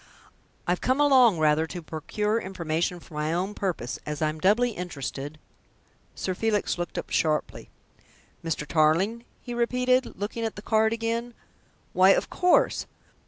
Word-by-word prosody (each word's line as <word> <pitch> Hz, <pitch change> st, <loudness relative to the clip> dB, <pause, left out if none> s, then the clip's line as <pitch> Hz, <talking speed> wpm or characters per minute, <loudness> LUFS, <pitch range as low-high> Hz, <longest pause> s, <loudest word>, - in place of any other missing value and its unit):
I've 175 Hz, 0 st, 0 dB
come 260 Hz, +2 st, +1 dB
along 260 Hz, -9 st, +6 dB
rather 155 Hz, +1 st, +3 dB
to 175 Hz, +1 st, -6 dB
procure 210 Hz, +8 st, -2 dB
information 175 Hz, -1 st, -2 dB
for 170 Hz, -, -17 dB
my 150 Hz, +1 st, -1 dB
own 185 Hz, +4 st, -1 dB
purpose 180 Hz, -12 st, -3 dB
as 150 Hz, -1 st, -5 dB
I 155 Hz, -, +1 dB
am 155 Hz, +1 st, -6 dB
doubly 215 Hz, +8 st, +3 dB
interested 145 Hz, -, -6 dB, 0.4 s
" -, -, -38 dB, 0.3 s
Sir 185 Hz, -, -2 dB
Felix 210 Hz, -2 st, 0 dB
looked 175 Hz, -, -4 dB
up -, -, -5 dB
sharply. 155 Hz, -2 st, -1 dB, 0.7 s
"Mr. 165 Hz, -2 st, -2 dB
Tarling?" 170 Hz, +10 st, +2 dB, 0.2 s
he 245 Hz, -, -6 dB
repeated, 250 Hz, +2 st, +1 dB
looking 210 Hz, +3 st, -3 dB
at 225 Hz, -, -2 dB
the 205 Hz, -, -9 dB
card 220 Hz, 0 st, +2 dB
again. 230 Hz, +1 st, -2 dB, 0.6 s
"Why, 185 Hz, +1 st, +6 dB
of -, -, -1 dB
course! 360 Hz, 0 st, +2 dB
190 Hz, 155 wpm, -26 LUFS, 160-230 Hz, 0.7 s, along